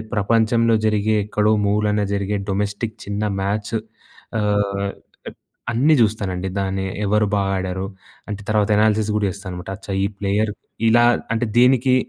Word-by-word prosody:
ప్రపంచంలో 115 +2 +3
జరిగే 110 0 +2
ఎక్కడో 105 0 +1
మూలన 105 0 +1
జరిగే 100 +1 -1
డొమెస్టిక్ 105 +3 -2
చిన్న 100 +1 -3 0.2
మ్యాచ్. 100 +3 -2 0.7
ఆహ్, 100 -1 0 0.8
అన్నీ 135 +7 +3
చూస్తానండి. 100 -4 0
దాన్ని 95 0 -1 0.2
ఎవరు 105 +1 +2
బాగా 100 -1 0
ఆడారు. 95 0 -3 0.4
అంటే 105 -1 -4
తర్వాత 105 -1 +2
అనాలిసిస్ 110 0 +2
కూడా 105 - +1
చేస్తానన్నమాట. 90 -2 -7
అచ్చా! 100 0 -9
ఈ - - +2
ప్లేయర్ 105 +2 0 0.4
ఇలా 120 +1 +5 0.3
అంటే 115 +1 0
దేనికి 130 +1 +4
105 Hz, 130 wpm, -21 LUFS, 100-110 Hz, 0.8 s, ఇలా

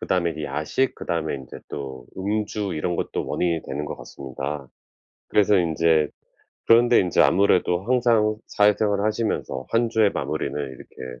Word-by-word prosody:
그다음에 90 -2 0
이제 80 -1 -5
야식 75 - -1
그다음에 80 -3 -2
인제 65 -2 -9
또 65 -3 -7
음주 105 0 -2
이런 85 +3 -1
것도 - - -3
원인이 85 -2 0
되는 70 +2 -3
것 - - -5
같습니다. 70 +1 -6 0.6
그래서 105 -1 +4
인제 80 -2 +2 0.6
그런데 120 +1 +6
인제 90 -2 +1
아무래도 90 -2 +3
항상 115 -3 +2
사회생활 105 0 +2
하시면서 110 - -2
1 115 +1 +2
주의 110 -2 +3
마무리는 - - -3
이렇게 65 -2 -8
90 Hz, 345 characters per minute, -24 LUFS, 75-105 Hz, 0.6 s, 그런데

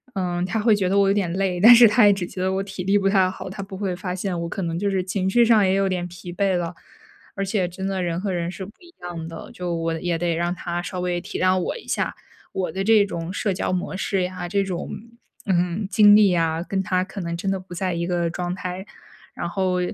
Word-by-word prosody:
嗯， 180 -2 -1
他 220 +4 -1
会 215 0 +4
觉 190 -3 0
得 195 - +2
我 200 -1 +4
有 195 - +3
点 195 -4 0
累， 185 -1 -1
但 230 +4 +10
是 235 -1 +9
他 210 0 +5
也 205 - +6
只 195 -2 -3
觉 185 - -7
得 185 0 +1
我 190 +1 -1
体 195 -2 -6
力 195 +2 +3
不 195 -1 +1
太 190 -2 +3
好， 185 - -7
他 195 - -6
不 195 0 -8
会 190 -2 -2
发 180 0 -4
现 185 -2 -3
我 170 - -4
可 195 - -4
能 165 -1 -2
就 200 +1 0
是 190 -2 0
情 185 +1 -1
绪 235 +4 +4
上 225 -2 +5
也 190 0 +2
有 195 0 +2
点 180 -1 -2
疲 175 0 -9
惫 190 0 +1
了。 175 0 -3 0.6
而 195 - -2
且 195 -2 0
真 190 +2 -5
的 190 -1 -2
人 170 -1 -1
和 200 -1 -2
人 170 -1 -2
是 185 +1 -7
不 200 - -11
一 345 -1 -18
样 170 -2 -6
的， 165 0 -9
就 180 -1 -4
我 165 -1 -2
也 175 -2 -1
得 170 0 0
让 175 +1 -1
他 175 -1 -4
稍 180 0 -5
微 180 -1 -1
体 - - -6
谅 185 0 +3
我 180 - -3
一 - - -13
下， - - -1 0.4
我 190 -1 -2
的 195 - -3
这 215 0 +5
种 170 -2 -5
社 205 -1 -1
交 185 - -2
模 185 +1 -2
式 195 0 -1
呀， 180 -1 -3
这 200 +2 +1
种， 185 -3 -4 0.6
嗯， 180 +2 0
经 205 -1 +7
历 210 -2 +6
呀， 165 -2 +1
跟 190 -1 0
他 185 0 +1
可 195 +1 -7
能 170 -1 -3
真 195 +3 -3
的 195 - 0
不 185 -1 -11
在 180 0 -2
一 170 0 -2
个 175 -1 0
状 175 +1 -3
态。 185 +1 -5 0.5
然 170 - -4
后， 185 0 0
185 Hz, 285 characters per minute, -23 LUFS, 175-195 Hz, 0.6 s, 但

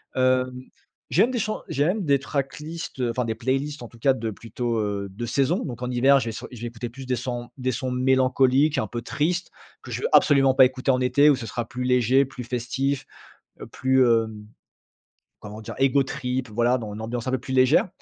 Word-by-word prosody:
Hem, 130 0 +1 0.5
j'aime 220 +9 +3
des 245 - -1
chants 215 0 -3
j'aime 175 +8 0
des 140 -2 +4
tracklist, 145 +2 -5
enfin 125 +1 -1
des 110 -1 -2
playlists 135 +4 -2
en 120 - -9
tout 120 - -17
cas 135 +3 +3
de 115 -3 -4
plutôt, 115 +2 -4
heu, 100 -2 -2
de 110 +5 -5
saison. 140 - 0
Donc 120 -3 -7
en 125 0 -3
hiver, 135 +3 +5
je - - -3
vais - - -2
sur 110 - -7
je 120 -3 -11
vais 120 - -3
écouter 120 +1 -6
plus 130 +3 -10
des 125 -1 -1
sons 120 0 -5
des 130 -1 -1
sons 130 +2 -3
mélancoliques, 130 +3 +3
un - - 0
peu 120 - -5
tristes 170 +9 -2 0.3
que - - -10
je - - -3
veux 465 - +1
absolument 135 -2 +5
pas 130 0 +7
écouter 130 +1 +2
en 130 0 +1
été 140 +4 +4
où 145 - +5
ce 120 - -7
sera 115 +2 -4
plus 125 0 -5
léger, 125 +1 +3
plus 130 -2 -8
festif 130 +3 -2 0.7
plus, 130 0 +2
heu, 115 -2 +3 1.1
comment 105 +1 -9
dire? 110 - -8
Ego 135 +1 +3
trip, 130 -2 -3
voilà 120 +4 +1
dans 110 -3 -6
une 110 - -7
ambiance 115 +2 -4
un - - 0
peu 130 - +1
plus 130 +2 -6
légère. 130 +7 +4
130 Hz, 215 wpm, -24 LUFS, 120-135 Hz, 1.1 s, pas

